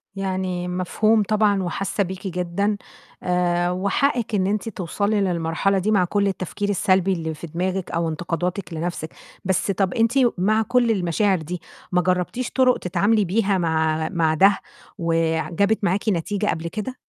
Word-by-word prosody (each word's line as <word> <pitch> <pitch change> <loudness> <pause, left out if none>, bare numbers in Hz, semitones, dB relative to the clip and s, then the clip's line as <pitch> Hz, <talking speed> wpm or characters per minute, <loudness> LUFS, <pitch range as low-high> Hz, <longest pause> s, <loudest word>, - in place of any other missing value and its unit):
يعني 185 -2 -2
مفهوم 210 +5 +2
طبعًا 205 -2 +2
وحاسة 195 +3 -1
بيكِ 190 +1 -6
جدًا، 180 +4 -1 0.5
آآ، 175 0 +1
وحقِّك 210 +5 0
إن 185 -1 +1
أنتِ 210 +2 -1
توصلي 200 +2 -1
للمرحلة 175 +2 0
دي 205 +4 0
مع 195 -4 +4
كُلّ 200 +2 +1
التفكير 195 +1 -3
السلبي 190 -1 +2
اللي 160 -2 -3
في 155 +2 -8
دماغِك، 185 +3 -2
أو 165 0 0
انتقاداتِك 175 +3 -3
لنَفْسِك، 165 -1 -3 0.4
بس 190 +1 +1
طَب 190 -1 0
أنتِ 230 0 +2 0.3
مع 215 +5 +2
كُلّ 240 0 +2
المشاعر 190 +1 +1
دي 175 +3 -5 0.3
ما 180 - +3
جربتيش 185 +7 -1
طُرُق 255 -1 +3
تتعاملي 205 +4 +1
بيها 200 +1 +1
مع 160 -2 0
مع 165 -4 +1
ده، 195 +5 +4 0.4
وآآ، 165 -1 +1
ع - - -6
جابت 200 +5 +1
معاكِ 200 +4 +1
نتيجة 205 +3 -1
قبل 165 -3 -1
كده؟ 215 +8 -5
185 Hz, 160 wpm, -22 LUFS, 175-205 Hz, 0.5 s, مع